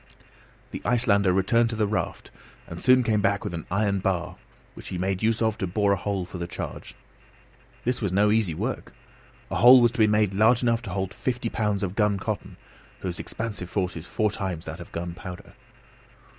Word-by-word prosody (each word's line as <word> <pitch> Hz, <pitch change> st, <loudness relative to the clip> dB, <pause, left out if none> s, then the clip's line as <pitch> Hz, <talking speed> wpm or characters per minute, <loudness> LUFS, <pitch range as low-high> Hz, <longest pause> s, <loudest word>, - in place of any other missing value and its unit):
The -, -, -6 dB
Icelander 105 Hz, -6 st, +3 dB
returned 115 Hz, +6 st, +2 dB
to 115 Hz, -, -3 dB
the 110 Hz, -1 st, +1 dB
raft 105 Hz, +1 st, -3 dB, 0.3 s
and 85 Hz, 0 st, -8 dB
soon 130 Hz, 0 st, +5 dB
came 110 Hz, -3 st, +1 dB
back 100 Hz, 0 st, +1 dB
with -, -, -4 dB
an 80 Hz, -2 st, -6 dB
iron 100 Hz, +1 st, +1 dB
bar 95 Hz, -2 st, -2 dB, 0.4 s
which -, -, -11 dB
he 90 Hz, -, -4 dB
made 95 Hz, +1 st, -1 dB
use 115 Hz, +1 st, +1 dB
of 110 Hz, -1 st, 0 dB
to 95 Hz, -, -1 dB
bore 100 Hz, +3 st, +1 dB
a -, -, +4 dB
hole 95 Hz, 0 st, -2 dB
for 90 Hz, 0 st, -8 dB
the 85 Hz, -, -3 dB
charge. -, -, -7 dB, 0.9 s
This 125 Hz, 0 st, -1 dB
was 100 Hz, -4 st, 0 dB
no 105 Hz, +2 st, +3 dB
easy 105 Hz, -7 st, +1 dB
work. -, -, -4 dB, 0.6 s
A -, -, 0 dB
hole 125 Hz, +3 st, +9 dB
was 120 Hz, -1 st, +4 dB
to 120 Hz, -, -8 dB
be 110 Hz, -, +6 dB
made 105 Hz, -2 st, +2 dB
large 110 Hz, +5 st, +4 dB
enough 115 Hz, -1 st, +2 dB
to 115 Hz, -, -8 dB
hold 95 Hz, +1 st, -3 dB
fifty 125 Hz, -2 st, -2 dB
pounds 105 Hz, -3 st, -1 dB
of 95 Hz, 0 st, -3 dB
guncotton, 105 Hz, 0 st, -1 dB, 0.4 s
whose 90 Hz, -2 st, -4 dB
expansive 105 Hz, -6 st, -4 dB
force 90 Hz, -2 st, -1 dB
is 80 Hz, +2 st, -7 dB
four 110 Hz, -2 st, 0 dB
times 95 Hz, -4 st, -4 dB
that 80 Hz, +3 st, -7 dB
of 85 Hz, -, -10 dB
gunpowder. 85 Hz, +1 st, -7 dB
100 Hz, 200 wpm, -25 LUFS, 90-110 Hz, 0.9 s, hole